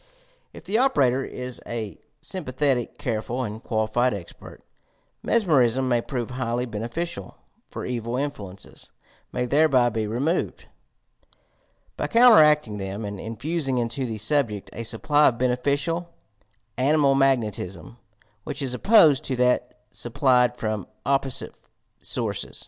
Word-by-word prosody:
If - - -12
the 215 +4 0
operator 135 - +3
is 125 -1 -7
a 110 -3 -5 0.2
sympathetic, 135 - -2
careful, 120 +2 -3
and 110 0 -6
quali 110 -1 0
fied 120 +1 +1
expert, 90 -4 -11 0.6
mesmerism 135 - +2
may 120 -2 +2
prove 120 -1 -4
highly 125 -1 -2
beneficial, 115 - -5 0.3
for - - -7
evil 120 0 -3
influences 100 -9 -6 0.4
may 125 - -1
thereby 135 -2 +3
be 110 -2 -2
removed, 140 +11 -1 1.3
by - - -1
counter 235 -5 +7
acting 150 -9 +3
them 100 +3 -5
and 100 -1 -6
infusing 135 - -2
into 120 +2 -1
the 110 -2 -4
subject 110 -2 +1
a - - -6
supply 145 +7 +2
of 120 - +1
beneficial 140 +7 -1 0.7
"animal 140 +2 +3
magnetism" 115 -7 -1 0.5
which - - -4
is 130 -2 -2
opposed 155 - +5
to 130 - -1
that 125 0 +1 0.2
supplied 125 0 +1
from 110 -3 -3 0.2
opposite 135 -1 -1 0.4
sources. - - -3
125 Hz, 125 wpm, -24 LUFS, 115-140 Hz, 1.3 s, counter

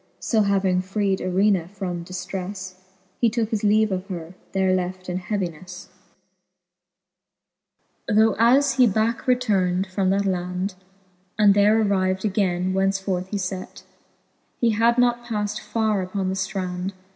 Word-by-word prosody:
So 220 -3 +1
having 195 -2 +2
freed 195 0 -1
Irena 185 -1 +2
from 180 -3 -5
diftreiTe, 185 +1 -6 0.5
He 235 - +4
tooke 225 -1 -1
his 220 -2 -1
leave 215 0 +3
of 185 +1 -3
her, 175 -3 -7 0.2
there 190 -1 +2
left 185 0 -3
in 180 +1 -2
heavinefle. 180 -2 -5 2.2
XXVIII. 210 - +1
Tho 220 -1 +4
as 265 +4 +4
he 250 -2 +6
backe 220 +4 0
returned 195 -7 +2
from 190 0 -1
that 200 +1 +1
land, 180 +1 -2 0.6
And 205 -2 +6
there 205 +2 +4
arriv'd 190 -2 +1
againe, 185 -3 0
whence 195 +1 +1
forth 185 -1 -3
he 205 - -3
fet. 185 -1 -5 0.8
He 235 -2 +3
had 230 +3 +2
not 240 -1 +2
paffed 210 -3 -3
farre 220 -3 0
upon 185 +1 -2
the 190 - -2
ftrand. 185 -1 -3
195 Hz, 145 wpm, -23 LUFS, 185-215 Hz, 2.2 s, he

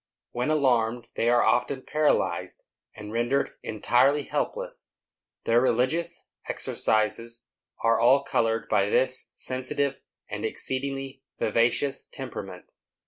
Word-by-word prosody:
When 120 +4 -1
alarmed, 120 -6 +1
they 115 - +1
are 120 0 +4
often 125 +2 +1
paralyzed, 155 0 0 0.3
and 105 -1 -8
rendered 120 +4 +1
entirely 125 +6 +2
helpless. - - -4 0.6
Their 115 +1 +3
religious 130 +8 0 0.2
exercises 115 +2 0 0.4
are 115 0 +3
all 130 +4 +5
colored 115 -4 0
by 100 -2 +2
this 130 +3 +2
sensitive 130 +2 -2 0.3
and - - -5
exceedingly 135 0 -2 0.2
vivacious 120 +5 +1
temperament. 100 -9 -8
125 Hz, 105 wpm, -26 LUFS, 115-140 Hz, 0.6 s, all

